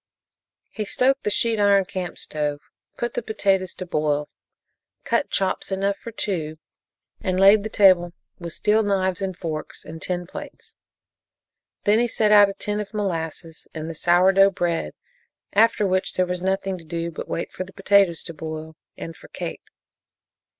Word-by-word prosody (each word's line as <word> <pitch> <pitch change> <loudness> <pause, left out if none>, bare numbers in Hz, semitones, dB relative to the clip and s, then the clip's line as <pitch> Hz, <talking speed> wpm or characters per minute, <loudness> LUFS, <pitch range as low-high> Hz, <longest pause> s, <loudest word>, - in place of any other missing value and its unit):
He 215 - -3
stoked 265 +6 +2
the - - -1
sheet 225 +2 +1
iron 200 -1 +4
camp 180 -1 -5
stove, 150 -1 -3 0.4
put 240 - -2
the 245 - -2
potatoes 195 -4 0
to 185 - -6
boil, 150 -3 0 0.7
cut - - 0
chops 190 0 -1
enough 195 +1 0
for 230 - -8
two 160 -8 -3 0.6
and 185 -2 -1
laid 200 +2 +7
the 220 - -5
table 185 -5 +5 0.3
with 170 - -6
the - - -9
steel 215 +1 +3
knives 190 -3 0
and 190 -2 -3
forks 155 -3 -5
and 160 +1 -9
tin 180 -1 -2
plates. - - -10 1.1
Then 210 +2 +4
he 240 - +2
set 215 -2 +2
out 205 -1 +8
a 195 - -6
tin 210 0 -2
of 210 0 -6
molasses 165 -4 -4
and 155 0 -4
the 165 - -5
sour 175 +4 +4
dough 195 +1 +6
bread, 175 -3 -2 0.6
after 220 0 +4
which 185 0 0
there 185 - +2
was 180 0 -3
nothing 190 0 -1
to - - -13
do 170 +1 -4
but 155 - -7
wait 170 - -3
for - - -4
the 185 - -13
potatoes 195 -3 +3
to 170 - -8
boil, 160 0 -7 0.2
and 165 - -7
for - - -15
Kate. - - -6
190 Hz, 175 wpm, -23 LUFS, 170-205 Hz, 1.1 s, out